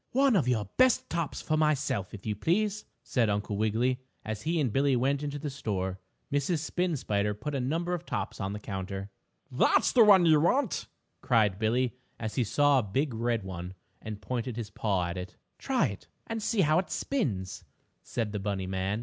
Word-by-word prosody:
"One 270 -1 +4
of 160 -10 +2
your 115 -4 +1
best 255 -1 +4
tops 165 -3 -2
for 155 - +1
myself, 135 -9 +1
if 100 - -10
you 105 -1 -1
please," 205 - 0 0.2
said 120 -4 +1
Uncle 105 0 -1
Wiggily, 115 +5 +1 0.3
as 110 -1 -4
he 165 +5 0
and 130 -8 0
Billie 135 -1 +3
went 135 +3 +1
into 145 -1 -3
the 150 +1 -5
toy 140 - -5
store. 95 -6 -2 0.3
Mrs. 145 +4 +1
Spin 170 +2 -1
Spider 105 -3 0
put 150 +8 -5
a 140 - 0
number 165 +8 -1
of 175 -1 -3
tops 105 - -4
on 95 0 -2
the 105 - -5
counter. 95 -1 -5 0.4
"That's - - +3
the 240 - +7
kind 195 -5 +7
you 155 -2 +6
want!" 250 - +1 0.3
cried 105 -5 +2
Billie, 120 +3 +1 0.3
as 110 -2 -3
he 125 - +1
saw 145 +5 +4
a - - -1
big 130 +7 -1
red 115 -1 0
one, 90 -1 -6 0.3
and 105 -1 -7
pointed 125 +2 -3
his 110 -3 -5
paw 100 -4 0
at 85 +1 -4
it. 90 0 -8 0.2
"Try 255 - +1
it 100 - -9 0.2
and 225 -1 -4
see 210 -1 +1
how 155 0 +4
it 185 - -3
spins," 105 - -2 0.4
said 115 -3 -3
the 105 - -3
bunny 95 -1 -2
man. 95 +3 -1
125 Hz, 200 wpm, -29 LUFS, 105-155 Hz, 0.4 s, the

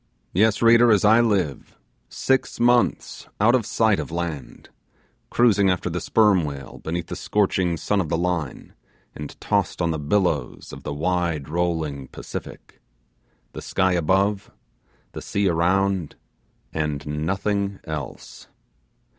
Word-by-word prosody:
Yes, 110 +4 +2
reader, 115 +1 +6
as 105 -1 +3
I 110 +3 +6
live, 95 - -1 0.3
six 130 0 0
months 120 0 +1
out 110 +4 +4
of 120 -4 +1
sight 110 -3 +2
of - - -5
land; 85 -4 -5 0.6
cruising 105 -5 +3
after 90 -1 -1
the 90 - -3
sperm 105 -5 +3
whale 70 -3 -7
beneath 85 +1 -3
the - - -6
scorching 95 -4 0
sun 100 +4 0
of 80 - -4
the 80 - 0
Line, 85 -2 -3 0.4
and 75 -1 -9
tossed - - -1
on 85 -1 +1
the 80 - -3
billows 75 -4 -1
of - - -9
the - - -5
wide 85 -1 -1
rolling 80 -5 -2
Pacific - - -9 0.7
the - - -7
sky 95 0 +1
above, 95 +4 +1 0.6
the - - -7
sea 100 0 -1
around, 90 0 +1 0.6
and 75 -2 -2
nothing 95 +6 -2
else! 75 -2 -7
90 Hz, 135 wpm, -23 LUFS, 80-105 Hz, 0.7 s, reader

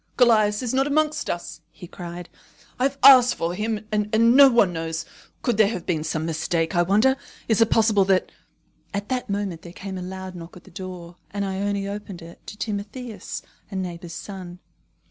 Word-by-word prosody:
"Callias 215 -3 +4
is 245 - -2
not 270 +1 +2
amongst 305 +1 0
us," 170 -2 -5
he - - -12
cried. 175 0 -8 0.5
"I 255 - +3
have 275 0 -1
asked 250 -3 +8
for 165 +1 -2
him, 215 +2 -3
and 210 -1 0
no 235 +5 +7
one 220 -7 +3
knows. 165 0 -3 0.4
Could 240 -4 +1
there 215 -2 +6
have 185 -5 -4
been 160 -4 -1
some 160 0 -2
mistake, 165 +1 -1
I 175 - +4
wonder? 215 +9 +3 0.3
Is 220 -1 +2
it 225 - +5
possible 215 -3 +4
that 190 -1 +2 0.3
" - - -39
At 200 +1 -4
that 255 -2 -2
moment 200 -4 -2
there 170 - -11
came 190 0 -6
a - - -6
loud 185 0 -6
knock 170 0 -10
at 180 - -15
the 195 - -17
door, 180 -2 -8
and 200 0 -3
Ione 195 +1 -2
opened 200 -3 -7
it 170 +1 -14
to 210 - -8
Timotheus, 210 +2 -5 0.3
a 200 - -8
neighbour's 175 -2 -5
son. 185 -3 -8
200 Hz, 195 wpm, -24 LUFS, 175-220 Hz, 0.5 s, asked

